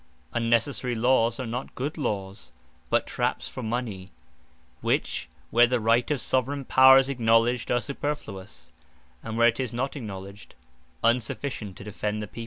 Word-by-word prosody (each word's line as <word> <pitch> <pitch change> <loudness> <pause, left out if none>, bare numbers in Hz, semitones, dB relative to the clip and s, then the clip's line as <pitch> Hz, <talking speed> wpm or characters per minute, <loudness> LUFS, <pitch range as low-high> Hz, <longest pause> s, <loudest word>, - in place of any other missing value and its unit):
Unnecessary 120 +2 +1
Lawes 115 0 +2
are 130 - -3
not 120 +3 -5
good 145 +4 -3
Lawes; 100 -9 -4 0.4
but - - +2
trapps - - -2
for - - -7
Mony: 110 -5 -4 0.7
which - - -1 0.2
where 120 +1 +6
the 125 0 +1
right 115 +4 +2
of 150 -3 0
Soveraign 130 +3 -1
Power 130 +1 +8
is 135 0 +4
acknowledged, 120 -1 +2
are 120 - +3
superfluous; 135 -9 -6 0.5
and 110 0 -5
where 115 0 +6
it 115 - -4
is 130 -4 -2
not 135 +5 -2
acknowledged, 100 -5 -8 0.5
unsufficient 115 -3 -1
to - - -9
defend 105 +1 -3
the 105 - -3
People. 115 - -11
120 Hz, 155 wpm, -26 LUFS, 110-130 Hz, 0.7 s, Power